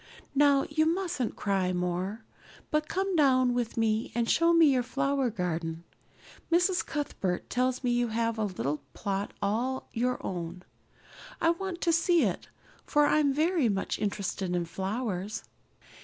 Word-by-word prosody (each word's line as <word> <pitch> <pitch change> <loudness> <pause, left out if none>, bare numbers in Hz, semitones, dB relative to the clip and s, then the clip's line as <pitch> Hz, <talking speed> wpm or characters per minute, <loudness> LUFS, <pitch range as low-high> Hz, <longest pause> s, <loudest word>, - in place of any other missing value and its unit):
Now, 280 -1 +4
you 315 +1 +1
mustn't 340 - -1
cry 195 -2 0
any 180 - 0
more, 180 +5 -2 0.5
but 305 -1 +1
come 385 0 -1
down 255 -5 +4
with 240 -2 -2
me 220 0 +1
and 235 -1 +1
show 335 +6 +4
me 330 -4 +6
your 255 - +2
flower 275 +1 0
garden. 170 -5 -3 0.7
Miss 355 +2 +3
Cuthbert 200 - -3
tells 255 +1 0
me 245 - +1
you 240 0 +2
have 230 0 -1
a 215 - +1
little 150 -7 -3
plot 200 -1 -2
all 240 +6 -1
your 250 +2 0
own. 175 0 -5 0.8
I 330 - +4
want 355 0 -4
to 335 - +2
see 335 0 +3
it, - - -2 0.3
for 295 -1 +3
I'm 290 -1 +3
very 310 -2 +2
much 195 -1 -2
interested 200 -3 -2
in 175 -1 0
flowers." 195 +2 -3
245 Hz, 155 wpm, -29 LUFS, 195-300 Hz, 0.8 s, me